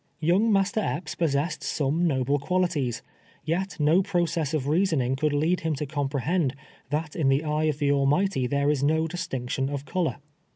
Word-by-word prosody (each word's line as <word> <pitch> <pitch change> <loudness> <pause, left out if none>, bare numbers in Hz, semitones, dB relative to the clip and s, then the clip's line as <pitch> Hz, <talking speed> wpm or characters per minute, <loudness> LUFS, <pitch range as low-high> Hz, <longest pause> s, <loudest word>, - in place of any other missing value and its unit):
Young 180 +8 +3
Master 200 +1 +2
Epps 170 -6 -3
possessed 155 0 -1
some 155 +4 0
noble 140 -1 +1
qualities, 150 -6 -1 0.4
yet 180 +4 -2
no 155 +5 +4
process 170 -6 0
of 150 -4 -1
reasoning 150 -6 +1
could 150 +3 0
lead 155 +5 +1
him 160 -1 -1
to 150 - -3
com 140 -1 -2
prehend, 145 +1 0 0.4
that 150 +2 -2
in 150 -5 +2
the 135 +3 +2
eye 155 0 0
of 155 -2 0
the 145 -1 +1
Almighty 140 +1 +2
there 140 +2 +1
is 145 -3 -1
no 160 +3 +2
distinction 135 -6 -3
of 140 -1 -4
color. 180 -1 -1
150 Hz, 175 wpm, -26 LUFS, 140-175 Hz, 0.4 s, no